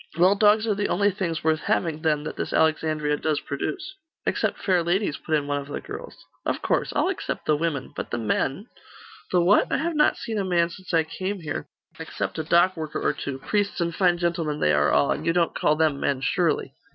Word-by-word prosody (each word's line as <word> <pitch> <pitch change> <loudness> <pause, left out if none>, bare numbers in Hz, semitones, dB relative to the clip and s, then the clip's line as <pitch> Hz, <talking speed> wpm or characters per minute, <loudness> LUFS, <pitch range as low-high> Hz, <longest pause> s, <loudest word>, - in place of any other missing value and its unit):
'Well, 180 +3 +6
dogs 210 +2 +4
are 220 - +1
the 205 0 -1
only 205 +2 +2
things 175 -5 -3
worth 160 0 +2
having, 160 -2 -1
then, 155 -2 +1
that 155 - -5
this - - -4
Alexandria 155 -1 +1
does 155 -1 0
produce.' 370 - -4 0.3
'Except - - 0
fair 185 -3 +2
ladies!' 175 -1 0
put 160 - -1
in 145 -2 0
one 145 0 -1
of 140 - -11
the 145 - -4
girls. 430 +5 -9 0.2
'Of - - -2
course. - - 0
I'll - - +2
except 385 - -4
the 155 - +3
women. 150 -4 -2
But - - -5
the 120 - -2
men 135 - -1 0.3
' 445 -1 -19
'The 180 - +4
what? 185 +5 +4
I - - +2
have 330 +2 -2
not 300 0 +3
seen 220 -2 -3
a - - 0
man 175 -2 +1
since 185 +1 -9
I 165 -2 +3
came 185 +4 -4
here, 145 - -4 0.3
except - - -4
a - - -1
dock 175 +3 +4
worker 155 -2 -4
or - - +1
two 140 -2 -5
priests 205 +8 -1
and 170 -1 0
fine 175 -1 +3
gentlemen 170 -3 -1
they 75 - +3
are 75 0 +3
all 140 - +3
and 150 - -2
you 165 +1 +1
don't 170 -1 +1
call 150 - +2
them 155 -3 +1
men, 135 -2 0
surely? 155 -1 0
170 Hz, 230 wpm, -25 LUFS, 150-195 Hz, 0.3 s, Well